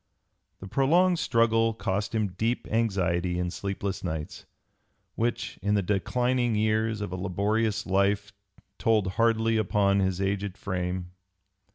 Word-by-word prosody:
The 95 - -7
prolonged 170 - +3
struggle 115 -1 +2
cost 105 +1 -2
him 105 -2 +1
deep 110 +7 -2
anxiety 90 -6 0
and 90 0 -2
sleepless 100 -1 -4
nights, 80 -4 -5 0.7
which 120 +1 -2
in 105 +2 +1
the 100 - +1
declining 120 +5 0
years 110 0 +1
of 105 - -4
a - - -3
laborious 100 +4 0
life 100 +2 +1 0.5
told 110 -4 +2 0.2
hardly 115 -1 +3
upon 100 -1 +2
his 95 -1 0
aged 100 0 -2
frame. 90 -2 -3
105 Hz, 130 wpm, -27 LUFS, 95-115 Hz, 0.7 s, prolonged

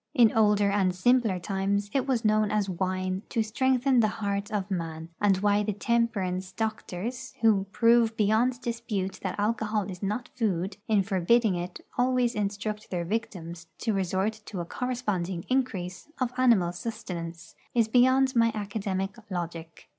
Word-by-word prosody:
In 235 -5 +6
older 210 -2 +4
and 190 -3 +2
simpler 225 0 +3
times 200 +2 -1
it 270 -1 +1
was 245 -4 0
known 215 0 +3
as 210 -1 +1
wine 185 0 -2
to 225 - +1
strengthen 260 +3 +2
the 220 - +4
heart 200 -1 -2
of 205 -2 -2
man; 165 -2 -4
and 200 -2 +4
why 205 +1 +2
the 210 0 -1
temperance 195 -4 0
doctors, 220 +3 -4
who 210 -4 +4
prove 230 0 +4
beyond 225 +4 +2
dispute 230 -6 -3
that 185 -1 -3
alcohol 215 0 0
is 180 - -9
not 210 +5 -2
food, 195 -5 -1
in 210 -3 +3
forbidding 200 +3 +2
it 175 +1 -5 0.2
always 250 -1 +2
instruct 210 +1 -3
their 175 -2 -2
victims 175 -5 -4
to 225 - -1
resort 195 +3 -1
to 195 - -5
a 170 - -3
corresponding 195 -7 -2
increase 250 -6 -2
of 250 -2 -1
animal 230 -9 +4
sustenance, 170 -4 -6 0.2
is 230 -2 +4
beyond 260 +3 +4
my 230 -1 +4
academic 200 -2 -3
logic. 170 -3 -6
205 Hz, 155 wpm, -28 LUFS, 185-230 Hz, 0.2 s, In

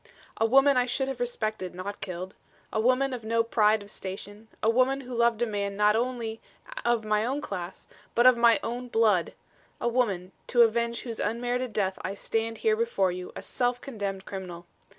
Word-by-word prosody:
A 225 - +3
woman 270 +3 +5
I 250 0 +3
should 265 +2 0
have 265 -2 -5
respected, 215 -6 -3
not 200 +3 -6
killed. 185 0 -5 0.4
A 220 - +1
woman 255 +4 +2
of 245 -3 -5
no 230 +1 +2
pride 220 -2 +3
of 205 - -11
station; 205 +3 -7 0.2
a - - +3
woman 255 +4 +3
who 255 -1 -8
loved 235 -1 +2
a - - +3
man 200 -2 -3
not 210 0 +4
only 230 -2 -2 0.4
of 235 -2 +1
my 215 0 +2
own 265 +5 -1
class 185 -9 -6 0.3
but 240 - +4
of 255 -1 +8
my 235 -1 +5
own 245 +2 -4
blood 220 -7 +2 0.5
a - - -1
woman, 205 -7 0 0.2
to 240 -1 +6
avenge 235 +1 +1
whose 230 -3 -5
unmerited 245 +3 -1
death 195 -3 -1
I 195 +2 -4
stand 225 +2 -2
here 440 -1 +2
before 440 - +1
you 180 0 -6
a - - -7
self 245 0 -1
condemned 200 -7 -5
criminal. 180 -3 -7
225 Hz, 190 wpm, -28 LUFS, 205-245 Hz, 0.5 s, of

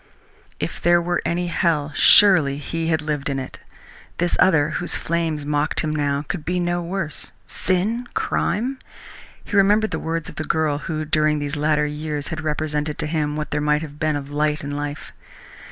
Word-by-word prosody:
If - - -4
there 175 0 +5
were 175 0 -1
any 175 +1 0
hell, 165 -4 0
surely 160 -7 +6
he 165 +3 -3
had 160 -1 +1
lived 150 -2 -2
in 135 - -1
it! 130 -1 -6 0.6
This 175 0 +1
other, 160 -5 +4
whose 175 - -1
flames 160 -3 -1
mocked 150 +1 0
him 155 -1 -2
now, 145 -1 0
could 175 -5 -4
be 180 +3 -1
no 175 0 0
worse. 170 -2 -2
Sin! 215 +7 0
Crime! 255 +5 -1 0.6
He - - -5
remembered 205 +2 +4
the - - -2
words 165 -1 -3
of - - -10
the 155 - -2
girl 155 -2 0
who 155 0 -3
during 155 0 +2
these 145 0 -3
latter 150 0 +2
years 150 0 -4
had 160 - -4
represented 150 -1 -2
to - - -2
him 150 -1 -1
what 150 0 -4
there 150 - 0
might 150 +1 +1
have 150 -1 -9
been 155 -1 +1
of 145 0 -5
light 150 +1 0
in 145 - -4
life. 145 0 -5
155 Hz, 185 wpm, -22 LUFS, 150-170 Hz, 0.6 s, surely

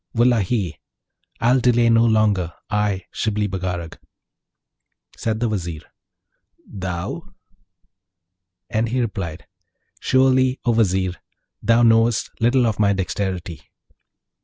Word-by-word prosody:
Wullahy! 115 -6 +1 0.6
I'll 120 +3 +3
delay 120 -1 +3
no 115 0 +5
longer, 105 -6 +2 0.2
I, 105 -3 0
Shibli 105 -1 -1
Bagarag.' 90 -3 -4 1.2
Said 110 -1 -2
the 120 - +1
Vizier, 85 -7 -4 0.8
'Thou?' 90 -3 -5 1.4
And 110 +1 0
he 130 +3 -1
replied, 95 -9 -4 0.5
'Surely, 130 0 +3
O 120 - +3
Vizier! 95 -5 +1 0.4
thou 115 +1 +3
knowest 115 -1 +3
little 120 +2 +3
of 110 -3 -1
my 100 -1 +3
dexterity.' 95 -3 -3
110 Hz, 100 wpm, -21 LUFS, 95-115 Hz, 1.4 s, no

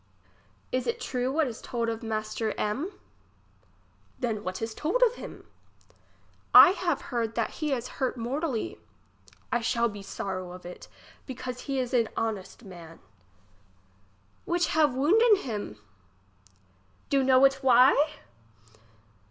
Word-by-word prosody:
It 255 -1 -1
is 235 - 0
true 250 0 -2
what 315 +2 +2
is 235 -4 -6
told 235 -2 -3
of 225 -1 -3
master 220 -1 -3
M? 265 - -2 1.3
Then 220 -4 -2
what 185 0 -4
is 225 0 -4
told 415 - +1
of 480 -2 +4
him? - - -10 1.1
I - - +11
have 345 -5 -1
heard 230 -2 -1
that 230 - -1
he 305 -2 -3
is 250 -2 -2
hurt 260 -1 0
mortally. 250 +1 -3 0.7
I 240 -1 +1
shall 235 +1 +1
be 205 -1 -9
sowow 185 -2 -5
of 180 0 -12
it, 180 - -10 0.4
because 250 -1 -6
he 275 - 0
is 255 0 -2
a 235 -2 +3
honestman. 190 -6 -5 1.5
Which 345 0 0
have 300 -4 +2
wounden 420 - +5
him? 215 - -5 1.3
Do 275 -1 +3
know 260 0 +5
it 270 0 +3
why 255 -1 +6
245 Hz, 130 wpm, -27 LUFS, 220-275 Hz, 1.5 s, I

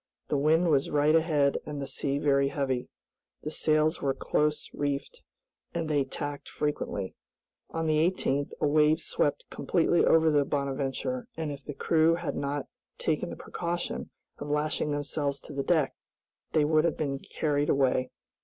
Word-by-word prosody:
The 145 - +1
wind 160 +4 +3
was 140 -2 +2
right 150 +1 +3
ahead 155 -4 +3
and 150 -1 -5
the 140 - -3
sea 140 +1 -2
very 140 -1 +3
heavy. 135 -3 -2 0.5
The 155 - -3
sails 155 +1 +2
were 135 -1 0
close 150 0 0
reefed, 145 - -3 0.5
and 165 -2 -1
they 145 -3 +2
tacked 145 +1 -5
frequently. 145 -10 -2 0.6
On 165 0 -2
the 155 -1 +2
18th, 145 -6 -1
a - - +1
wave 150 +2 +4
swept - - 0
completely 175 - +2
over 160 -1 +5
the 145 -1 +4
"Bonadventure"; 140 - -2
and 160 -2 -2
if 140 -1 -8
the 145 - -7
crew 160 +2 +3
had 175 -1 -3
not 140 0 -2 0.3
taken 160 +2 -1
the - - -6
precaution 175 0 -4 0.3
of 145 - -6
lashing 150 +1 0
themselves 145 -1 -2
to - - -10
the 140 - -1
deck, 155 -2 +2 0.6
they 155 -2 +4
would 155 0 +3
have 170 - +1
been 140 -3 -2
carried 145 -1 -1
away. 130 -2 +2
150 Hz, 165 wpm, -29 LUFS, 140-160 Hz, 0.6 s, over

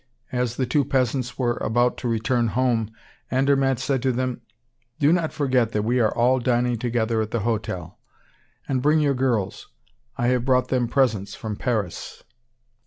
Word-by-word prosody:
As 125 -2 -1
the 130 - 0
two 140 +4 +2
peasants 130 -1 -1
were 120 -2 0
about 120 +2 +1
to 125 - -3
return 115 +1 +1
home, 115 -2 +1 0.4
Andermatt 135 0 +2
said 135 +1 -1
to 130 - +1
them: 125 0 -2 0.6
"Do 145 +3 +4
not 170 -3 0
forget 130 -6 +1
that 105 - 0
we 120 +3 +1
are 110 -3 +3
all 125 +2 +3
dining 120 -1 +1
together 115 -2 0
at 110 - -3
the 115 0 -2
hotel. 100 -6 -3 0.7
And 130 -2 0
bring 150 +3 +3
your 145 -2 +2
girls; 125 -7 -1 0.5
I 120 - +1
have 125 -1 +1
brought 130 0 +2
them 125 -2 +1
presents 115 -6 0
from 110 -5 -5
Paris." 105 -7 -3
125 Hz, 170 wpm, -23 LUFS, 115-130 Hz, 0.7 s, Do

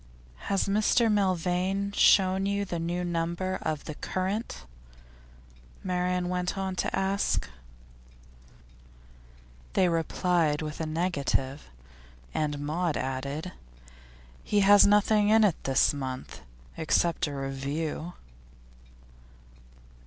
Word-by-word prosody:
'Has 195 0 +1
Mr 215 +3 +3
Milvain 190 0 0
shown 190 -1 +4
you 200 0 -1
the 175 -3 -4
new 175 +2 -2
number 170 +2 -2
of 155 -2 -3
The 155 - -5
Current?' 185 - -4 1.2
Marian 180 -1 -1
went 180 +1 -2
on 190 -1 -2
to - - -1
ask. 195 - 0 2.3
They 185 - +3
replied 165 -2 0
with 150 +1 -5
a 160 - -2
negative, 150 -4 -2 0.6
and 150 -1 -1
Maud 165 +2 -1
added: 140 +6 -4 0.9
'He 205 -1 +1
has 200 +1 +7
nothing 210 0 +3
in 220 0 +5
it 195 -6 +1
this 135 +2 +3
month, 130 - -6 0.4
except 165 +1 +1
a 145 - -5
review. 140 +5 -4
180 Hz, 100 wpm, -28 LUFS, 155-195 Hz, 2.3 s, has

